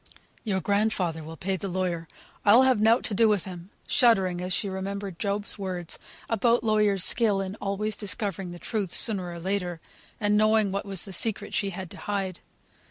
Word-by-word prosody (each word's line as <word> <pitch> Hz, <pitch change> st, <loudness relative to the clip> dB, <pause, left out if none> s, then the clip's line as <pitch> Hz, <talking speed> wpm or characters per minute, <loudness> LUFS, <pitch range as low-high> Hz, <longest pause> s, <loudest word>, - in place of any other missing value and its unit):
"Your 190 Hz, -4 st, -1 dB
grandfather 200 Hz, -6 st, 0 dB
will 160 Hz, +1 st, -9 dB
pay 190 Hz, +3 st, -2 dB
the 195 Hz, -, -5 dB
lawyer. 175 Hz, -3 st, -2 dB, 0.4 s
I'll 225 Hz, +5 st, +7 dB
have 260 Hz, -5 st, +3 dB
nought 225 Hz, +3 st, +4 dB
to 220 Hz, -, -2 dB
do 220 Hz, +2 st, +4 dB
with 205 Hz, -4 st, +1 dB
him," 180 Hz, -1 st, -9 dB, 0.2 s
shuddering 190 Hz, -8 st, +3 dB
as 180 Hz, +1 st, -3 dB
she 200 Hz, -, 0 dB
remembered 195 Hz, -1 st, -5 dB
Job's 205 Hz, 0 st, -1 dB
words, 180 Hz, -3 st, -3 dB, 0.3 s
about 230 Hz, +1 st, +2 dB
lawyers' 210 Hz, -4 st, +3 dB
skill 210 Hz, -3 st, +2 dB
in 195 Hz, 0 st, -3 dB
always 205 Hz, +2 st, -1 dB
discovering 200 Hz, -2 st, -4 dB
the 175 Hz, -, -8 dB
truth, 200 Hz, +3 st, -3 dB
sooner 185 Hz, -3 st, 0 dB
or 170 Hz, -, -7 dB
later; 180 Hz, -2 st, -2 dB, 0.4 s
and 210 Hz, -1 st, +2 dB
knowing 215 Hz, -1 st, +3 dB
what 200 Hz, +1 st, -3 dB
was 195 Hz, -1 st, +2 dB
the 195 Hz, -, -8 dB
secret 205 Hz, +2 st, +1 dB
she 200 Hz, -, +1 dB
had 185 Hz, -2 st, -7 dB
to -, -, -8 dB
hide. 195 Hz, -3 st, -3 dB
195 Hz, 185 wpm, -27 LUFS, 185-215 Hz, 0.4 s, I'll